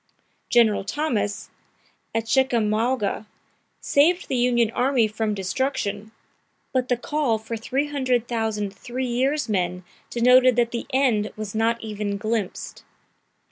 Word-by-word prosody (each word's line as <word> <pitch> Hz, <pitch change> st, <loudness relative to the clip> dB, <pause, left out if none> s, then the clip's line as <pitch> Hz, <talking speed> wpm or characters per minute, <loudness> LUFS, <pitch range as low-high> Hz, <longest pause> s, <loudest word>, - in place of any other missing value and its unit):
General 225 Hz, -4 st, +4 dB
Thomas, 220 Hz, -3 st, -2 dB, 0.6 s
at 225 Hz, 0 st, 0 dB
Chickamauga, 225 Hz, -3 st, +1 dB, 0.5 s
saved 340 Hz, +6 st, +3 dB
the -, -, 0 dB
Union 240 Hz, -2 st, +2 dB
Army 250 Hz, -2 st, +2 dB
from 215 Hz, 0 st, -2 dB
destruction, 205 Hz, +1 st, -2 dB, 0.6 s
but 255 Hz, -1 st, 0 dB
the 245 Hz, -, +2 dB
call 280 Hz, -3 st, 0 dB
for 220 Hz, +1 st, -6 dB
300,000 240 Hz, -5 st, -1 dB
three 245 Hz, +6 st, -5 dB
years' 260 Hz, +5 st, 0 dB
men 180 Hz, -3 st, -1 dB, 0.3 s
denoted 250 Hz, +1 st, +5 dB
that 235 Hz, -1 st, +2 dB
the 235 Hz, -, -4 dB
end 245 Hz, -6 st, +2 dB
was 215 Hz, -2 st, -6 dB
not 225 Hz, +1 st, +1 dB
even 210 Hz, -2 st, -3 dB
glimpsed. 215 Hz, -1 st, -3 dB
230 Hz, 115 wpm, -24 LUFS, 215-255 Hz, 0.6 s, denoted